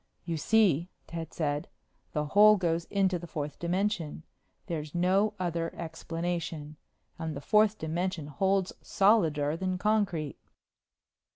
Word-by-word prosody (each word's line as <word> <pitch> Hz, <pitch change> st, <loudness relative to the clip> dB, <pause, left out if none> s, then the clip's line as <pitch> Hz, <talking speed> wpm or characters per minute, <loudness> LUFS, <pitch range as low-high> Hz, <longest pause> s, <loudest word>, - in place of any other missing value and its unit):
"You 170 Hz, -1 st, -2 dB
see," 180 Hz, -1 st, +3 dB, 0.2 s
Ted 165 Hz, -1 st, -6 dB
said, 145 Hz, -2 st, -2 dB, 0.5 s
"The 150 Hz, 0 st, 0 dB
hole 210 Hz, +6 st, +6 dB
goes 170 Hz, -2 st, 0 dB
into 190 Hz, -3 st, +1 dB
the 170 Hz, -, -8 dB
fourth 150 Hz, -2 st, -5 dB
dimension. 175 Hz, -3 st, -1 dB, 0.4 s
There's 155 Hz, -4 st, -5 dB
no 195 Hz, +4 st, +2 dB
other 170 Hz, -2 st, -1 dB
explanation. 165 Hz, -2 st, -4 dB, 0.4 s
And 160 Hz, -1 st, -3 dB
the -, -, -4 dB
fourth 210 Hz, +7 st, +3 dB
dimension 165 Hz, 0 st, -2 dB
holds 190 Hz, +6 st, 0 dB
solider 160 Hz, -8 st, +3 dB
than 185 Hz, +1 st, -2 dB
concrete." 195 Hz, -7 st, 0 dB
170 Hz, 120 wpm, -29 LUFS, 155-195 Hz, 0.5 s, hole